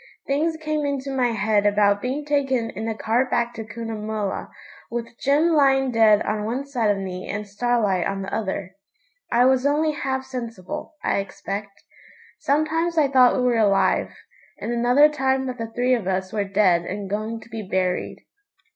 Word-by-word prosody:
Things 315 +4 0
came 310 -1 -2
into 275 -1 -2
my 250 -2 +2
head 210 -2 +1
about 205 0 +3
being 270 +4 -3
taken 270 -5 0
in 220 +3 -5
a 225 - -2
cart 240 +4 +1
back 235 0 0
to 225 - -6
Cunnamulla, 215 -2 -4 0.4
with 235 0 -5
Jim 290 +5 +3
lying 270 -4 +3
dead 220 -2 +5
on 210 0 -2
one 245 +6 -3
side 245 -6 0
of 205 - +2
me 185 -1 -6
and 205 +1 -4
Starlight 205 -3 0
on 195 0 -3
the 195 - -7
other. 190 -3 -3 0.6
I 245 +1 +4
was 260 0 +3
only 300 +2 +2
half 265 -2 -3
sensible, 250 - -6
I - - +1
expect. 200 +1 -6 0.6
Sometimes 325 +4 0
I 295 -3 +4
thought 255 -2 +5
we 255 - 0
were 245 -2 +2
alive, 200 -3 +2 0.5
and - - -4
another 245 +5 +5
time 265 -3 0
that 255 -1 -5
the 225 0 -5
three 245 +2 +1
of 230 -7 -1
us 190 0 -2
were 205 -2 0
dead 195 -3 +3
and 195 +3 -5
going 215 +3 -3
to 220 +1 -16
be 225 -1 -5
buried. 185 -2 -2
235 Hz, 180 wpm, -23 LUFS, 205-270 Hz, 0.6 s, dead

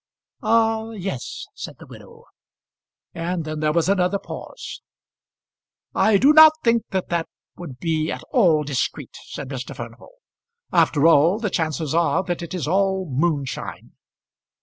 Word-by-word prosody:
"Ah; 225 -1 +2
yes," 190 - -5
said - - -8
the - - -13
widow. - - -14 0.9
And 170 0 -3
then 155 0 -4
there 155 0 +1
was 170 +2 +1
another 190 0 +2
pause. - - -9 1.1
"I 215 -2 +4
do 275 +9 +5
not 315 0 +9
think 230 -1 +2
that 190 -1 -2
that 170 -1 -1 0.3
would 150 -8 -9
be 160 0 -1
at - - -6
all 170 - +4
discreet," 140 -3 -3
said 130 - -7
Mr. 135 -1 -6
Furnival. - - -10 0.6
"After 145 0 +3
all, 165 +4 +5
the 215 -3 -3
chances 155 -2 -1
are 165 0 +2
that 175 -2 -3
it 170 +2 -6
is 165 -6 -3
all 190 +2 +1
moonshine." 140 -1 -2
170 Hz, 145 wpm, -22 LUFS, 155-200 Hz, 1.1 s, not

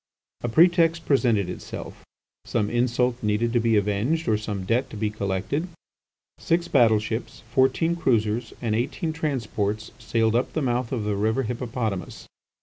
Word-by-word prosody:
A 120 - -2
pretext 165 +3 +4
presented 120 -9 +2
itself; 90 - -8 0.4
some 105 0 -1
insult 125 0 +1
needed 110 +2 0
to 120 - +4
be 115 -1 +2
avenged, 105 +11 0
or 110 - +3
some 105 -3 -4
debt 120 +6 +1
to 110 - -8
be 105 0 -1
collected. 105 - -2 0.7
Six 170 +1 0
battleships, 110 -3 +1
fourteen 135 +7 +2
cruisers, 115 -6 0
and 110 -2 0
eighteen 145 - -1
transports 110 -9 -2
sailed 110 0 +1
up 120 - 0
the 160 - -1
mouth 125 -1 -1
of 120 -5 -1
the 105 -1 -1
river 110 +6 +1
Hippopotamus. 115 -5 -4
115 Hz, 145 wpm, -25 LUFS, 105-130 Hz, 0.7 s, pretext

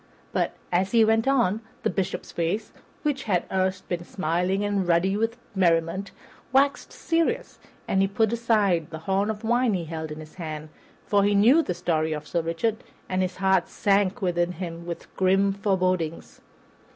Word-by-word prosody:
But, - - 0 0.2
as 185 +4 +1
he 225 -1 +6
went 225 +2 +2
on, 235 -6 +2 0.2
the - - +2
Bishop's 195 -1 -3
face, 175 +6 -2 0.3
that 295 -3 0
had 185 -8 0
erst 190 0 0
been 175 -1 -3
smiling 180 +3 -1
and 200 -3 0
ruddy 175 +3 +3
with 225 +2 -1 0.2
merriment, 175 +1 +1 0.4
waxed 275 +2 +2
serious, 335 +10 -1 0.3
and 190 - +2
he 195 - +3
put 220 +3 +1
aside 210 -8 +2
the 160 - -6
horn 195 +2 +1
of 215 0 -4
wine 240 -1 +2
he 175 -2 -3
held 160 0 -5
in 150 - -6
his 155 0 -11
hand, 155 -1 -5 0.4
for 200 -1 +3
he 205 0 +3
knew 240 +11 +6
the 180 - -3
story 160 -3 0
of 150 0 -6
Sir 170 - 0
Richard, 170 +7 -1 0.2
and 185 0 0
his 185 -1 -1
heart 190 -2 +2
sank 200 -1 +1
within 175 -1 +1
him 170 -1 -6
with 170 - -7
grim 195 +1 +3
forebodings. 185 -5 -1
190 Hz, 175 wpm, -25 LUFS, 170-210 Hz, 0.4 s, he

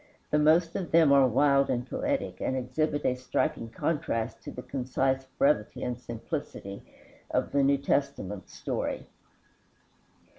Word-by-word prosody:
The 150 - +3
most 165 +3 +4
of 180 - -3
them 160 -3 +5
are 140 -2 +6
wild 140 +3 +3
and 125 +1 -1
poetic, 285 - -2
and 130 - 0
exhibit 145 +4 -1
a - - +3
striking 125 0 -1
contrast 115 -3 -2
to - - -8
the 125 - -8
concise 130 0 -1
brevity 140 -7 +2
and 125 - -1
simplicity 120 - -6 0.5
of - - 0
the 140 - +3
New 140 +1 +4
Testament 140 -9 -2
story. - - -3
140 Hz, 140 wpm, -28 LUFS, 125-150 Hz, 0.5 s, are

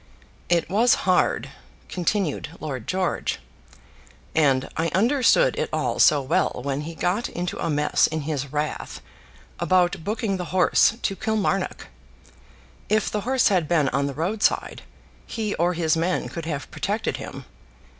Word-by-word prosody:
"It 175 -1 +2
was 225 +5 +4
hard," 185 -1 +2 0.4
continued 175 -3 -2
Lord 130 -7 -5
George, 185 -1 -1 1.0
"and 135 -4 +3
I 165 +2 0
understood 265 - +4
it - - -1
all - - -1
so 145 -2 +5
well 130 -2 0
when 140 0 -1
he 165 +2 -7
got 185 +8 -1
into 175 0 -4
a - - 0
mess 150 -1 +2
in 155 0 -3
his 140 -2 -3
wrath 150 0 -3 0.6
about 180 -1 +2
booking 210 0 -1
the 180 - -4
horse 185 +4 +3
to 195 - -1
Kilmarnock. 200 -3 -1 1.0
If 215 +1 +1
the 210 - -1
horse 255 +3 +2
had 180 -6 +1
been 150 -5 +2
on 140 - 0
the 140 - -5
roadside, 195 +7 0 0.5
he 215 -2 -3
or 175 +2 +2
his 160 -1 +2
men 170 +3 -1
could 165 -2 -6
have 145 -4 -4
protected - - -2
him. - - -8
175 Hz, 145 wpm, -24 LUFS, 155-200 Hz, 1.0 s, so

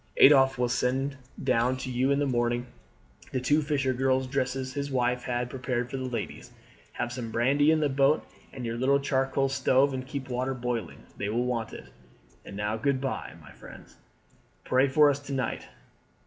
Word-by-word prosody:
"Adolphe 135 -2 +7
will 125 - +2
send 130 +3 0 0.3
down 125 0 +2
to 130 0 -5
you 125 +2 +1
in 140 - +3
the 145 - +1
morning 120 -1 0 0.7
the 130 - -1
two 145 +5 +2
fisher 140 -3 0
girls' 130 +1 +1
dresses 130 0 -2
his 140 0 -3
wife 125 -2 0
had 120 -1 -1
prepared 125 -1 -3
for 135 - -3
the 130 - -4
ladies. 115 -4 -5 0.4
Have 120 0 -3
some 120 -2 -5
brandy 135 +6 +3
in 160 -1 +3
the 150 - +3
boat 140 +2 +2 0.3
and 125 -2 -7
your 115 0 -3
little 140 +2 +3
charcoal 135 0 +1
stove, 135 0 +2
and 130 0 -5
keep 140 -1 -5
water 130 +1 -2
boiling. 120 -2 -4
They 100 - -2
will 120 +3 0
want 120 -3 -2
it. - - -11 0.5
And 100 - -9
now 105 +1 -1
good 130 +3 0
bye, 135 0 -4
my - - -15
good - - -17
friends! - - -13 0.7
Pray 130 +2 +3
for 150 +2 +5
us 140 - -3
to 145 -1 -7
night. 130 -4 -2
130 Hz, 190 wpm, -28 LUFS, 125-135 Hz, 0.7 s, Adolphe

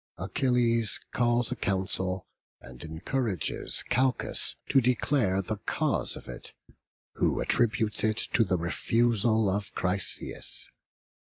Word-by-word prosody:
Achilles 115 +1 +1
calls 120 -1 +2
a - - -1
council, 95 -1 -1 0.3
and 60 0 -12
encourages 95 - -2
Calchas 130 +1 +1
to 135 - +5
declare 115 -5 +2
the 110 +2 -3
cause - - 0
of - - -12
it, - - -8 0.6
who - - +1
attributes 110 -2 +1
it 110 -1 +2 0.2
to 115 - +5
the 95 -3 0
refusal 110 +5 +2
of 100 +1 -1
Chryseis. 95 +1 -1
110 Hz, 110 wpm, -28 LUFS, 95-120 Hz, 0.6 s, to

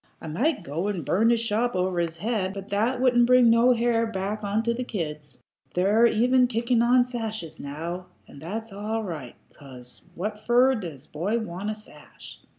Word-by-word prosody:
I - - -11
might 225 - 0
go 165 +6 -3
and 185 -8 -3
burn 200 - +3
his 235 -1 +3
shop 230 +1 0
over 180 -1 0
his 170 -1 -2
head, 205 -1 -2
but 195 0 -8
that 225 +6 0
wouldn't 240 -2 +4
bring 250 -2 +6
no 235 +2 +5
hair 230 -1 +1
back 210 0 -4
onto 220 +3 0
the 250 +2 -3
kids. 150 - -6 0.4
They're 205 +6 +4
even 250 +3 +3
kicking 235 0 +1
on 245 +1 +4
sashes 220 -8 -5
now, 170 +6 -6 0.2
and 140 - -13
that's 215 +6 -6
all 215 +3 -3
right, 155 - -6 0.2
'cause 125 -3 -12
what 210 +4 -5
fer 250 +2 +5
does 165 - -6
a - - -29
boy 190 +9 -1
want 205 -2 -4
a 215 - -2
sash?" 215 - -12
215 Hz, 185 wpm, -25 LUFS, 175-235 Hz, 0.4 s, bring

